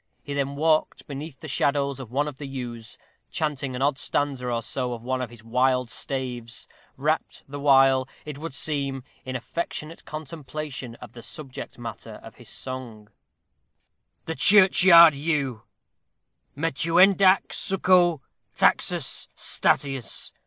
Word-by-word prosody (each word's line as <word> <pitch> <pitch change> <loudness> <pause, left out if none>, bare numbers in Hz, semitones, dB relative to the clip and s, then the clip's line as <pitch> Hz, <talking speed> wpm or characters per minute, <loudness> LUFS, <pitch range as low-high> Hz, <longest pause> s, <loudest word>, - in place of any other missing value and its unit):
He 145 - -5
then 140 0 -2
walked 155 +1 +1
beneath 145 0 -8
the 155 - -7
shadows 140 -1 0
of 130 -4 -8
one 140 +4 0
of 145 -3 -7
the 145 0 -7
yews, 120 -4 -7 0.3
chanting 140 -4 -2
an 130 - -2
odd 140 -2 +1
stanza 140 -4 -1
or 115 -1 -1
so 125 +1 -2
of 115 -1 -8
one 130 +1 -2
of 125 - -4
his 115 -2 -14
wild 125 +1 +1
staves, 125 -4 -5 0.3
wrapped - - -1
the 145 +1 -7
while, 135 -2 +4 0.2
it 150 -2 -7
would 160 -3 -6
seem, 140 -4 -2 0.2
in 130 0 -5
affectionate 160 +4 -5
contemplation 150 -4 -7
of - - -12
the 120 - -10
subject 135 +2 -8
matter - - -8
of - - -11
his - - -9
song: 120 -5 -7 1.2
THE 160 - -3
CHURCHYARD 180 0 +7
YEW 140 -5 -2 1.0
Metuendaque 180 +6 +4
succo 180 -5 +2 0.3
Taxus. - - +2
STATIUS. 135 -4 -1
140 Hz, 135 wpm, -25 LUFS, 130-155 Hz, 1.2 s, CHURCHYARD